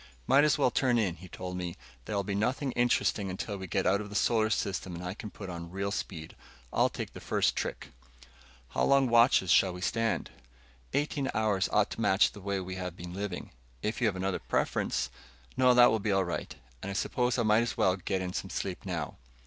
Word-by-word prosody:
"Might 140 - +5
as 150 0 +4
well 135 -4 +3
turn 125 0 +2
in," 95 -7 0
he 90 - -11
told 90 0 -6
me. 90 -1 -4 0.3
"There'll 100 -2 -1
be 100 +1 -3
nothing 125 +7 0
interesting 120 -5 +1
until 100 +2 -4
we 95 -1 -6
get 95 +2 0
out 100 +2 +3
of 105 - -7
the 105 - -8
solar 110 0 +3
system 95 -4 -2
and 85 - -7
I 90 - -3
can 105 +1 -8
put 100 -1 -9
on 85 -2 -6
real 100 +2 -3
speed. 80 -5 -5 0.4
I'll - - +3
take - - -6
the - - -8
first - - +1
trick." - - -4 0.8
"How - - 0
long 140 -1 +4
watches 115 -6 +5
shall 95 -2 +5
we 90 - -8
stand?" 115 +3 0 0.6
"Eighteen 145 -2 0
hours 105 -3 +1
ought 105 -1 +2
to - - -5
match 100 -2 +4
the 105 - -12
way 100 0 -1
we 95 0 -5
have 90 -1 -5
been 85 0 -7
living. 95 -1 -5 0.3
If 110 - -2
you 120 - +4
have 100 - 0
another 95 0 -1
preference 65 0 -1 0.2
" 65 +1 -27
"No, 125 -1 +5
that 120 0 +8
will 110 - +1
be 105 0 -1
all 95 -1 +3
right. 85 - -4 0.3
And 100 - -5
I - - -3
suppose 125 +5 0
I 120 - +2
might 110 +1 +4
as 120 - -2
well 95 - +3
get 95 0 -2
in 90 0 -4
some 95 - -3
sleep 95 0 -4
now." 85 -5 -3
100 Hz, 225 wpm, -30 LUFS, 90-115 Hz, 0.8 s, that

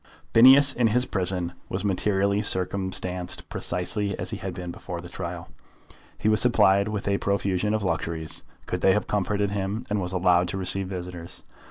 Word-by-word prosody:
Phineas 135 +4 +7
in 120 -2 +2
his 125 +3 +2
prison 90 -3 -2 0.2
was 95 +3 -3
materially 100 +1 +1
circumstanced 95 -2 -1
precisely 95 +3 -2
as - - -3
he 110 - -3
had 95 -3 -6
been 90 -1 -6
before 85 0 -7
the 85 - -9
trial. 85 -2 -6 0.7
He - - -2
was 110 0 +4
supplied 100 -5 +4
with 105 -2 -4
a 100 0 +1
profusion 100 +1 0
of 110 - -2
luxuries, 80 -2 -3 0.2
could - - -3
they 95 - +5
have 105 - 0
comforted 105 0 -1
him; 100 +4 -3
and 105 -1 +1
was 90 0 -3
allowed 90 -1 +3
to 90 - -2
receive 95 0 0
visitors. 90 -2 -7
95 Hz, 175 wpm, -25 LUFS, 90-105 Hz, 0.7 s, Phineas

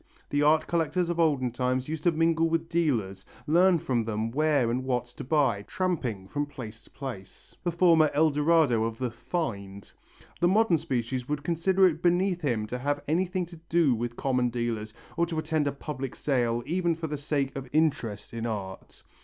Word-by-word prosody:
The 145 - +1
art 155 +2 +4
collector 170 +1 0
of 170 -1 -2
olden 140 -7 +2
times 125 +1 -1
used 155 0 -5
to 175 - +5
mingle 165 0 +2
with 165 0 -1
dealers, 115 - 0 0.2
learn 175 +4 +4
from 125 -6 -1
them 110 +1 -2
where 145 -3 +2
and 125 +2 -1
what 125 -2 -1
to 120 - -10
buy, 135 -7 +2
tramping 130 - -2
from 145 +6 -2
place 115 -5 -9
to - - -19
place, 115 -9 -9
the 175 - 0
former 165 -3 +5
El 155 +2 +3
Dorado 150 -6 +3
of 115 0 -4
the 125 -1 -2
"find." 100 - -5 0.5
The 175 - +3
modern 190 -3 +3
species 125 0 -3
would 150 -1 -2
consider 180 +4 +2
it 165 -3 +1
beneath 180 +1 +2
him 120 -8 0
to 125 +4 -5
have 145 +2 -1
anything 180 +3 0
to 170 0 -13
do 165 -5 +4
with 120 +1 -3
common 125 -2 +1
dealers 115 -2 -3 0.3
or 170 - +2
to 165 -2 -4
attend 155 -1 0
a - - +1
public 140 -2 -6
sale 120 -4 0
even 170 +2 0
for 165 0 -5
the 150 -1 -3
sake 140 -2 -2
of 135 -2 -6
interest 135 -11 0
in 115 0 -3
art. 95 -4 -6
145 Hz, 190 wpm, -27 LUFS, 120-165 Hz, 0.5 s, to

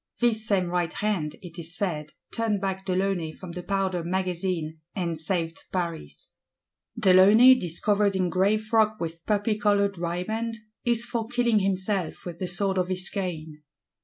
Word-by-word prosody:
This 220 -3 +1
same 195 -3 +2
right 175 -1 0
hand, 195 -8 -2
it 175 -1 -9
is 170 +1 -6
said, 155 -6 -3 0.2
turned 225 -3 0
back 190 0 -3
de 185 - 0
Launay 185 -4 0
from 185 +1 -9
the 180 +1 -6
Powder 190 -2 -1
Magazine, 175 -3 -2 0.2
and 170 -4 -2
saved 165 -1 -2
Paris. 170 -3 -5 0.6
De 200 -5 +4
Launay, 215 +8 +8
"discovered 200 0 +1
in 185 -2 0
gray 195 +3 +3
frock 215 0 +1
with 165 0 -5
poppy 210 0 +1
coloured 200 -2 +2
riband," 215 +7 -2 0.3
is 235 -1 +1
for 235 -2 -3
killing 240 -2 +2
himself 190 -2 -1
with 175 -1 -7
the 185 - -2
sword 190 +2 +1
of 180 - 0
his 185 0 0
cane. 160 -6 -4
190 Hz, 160 wpm, -26 LUFS, 175-210 Hz, 0.6 s, Launay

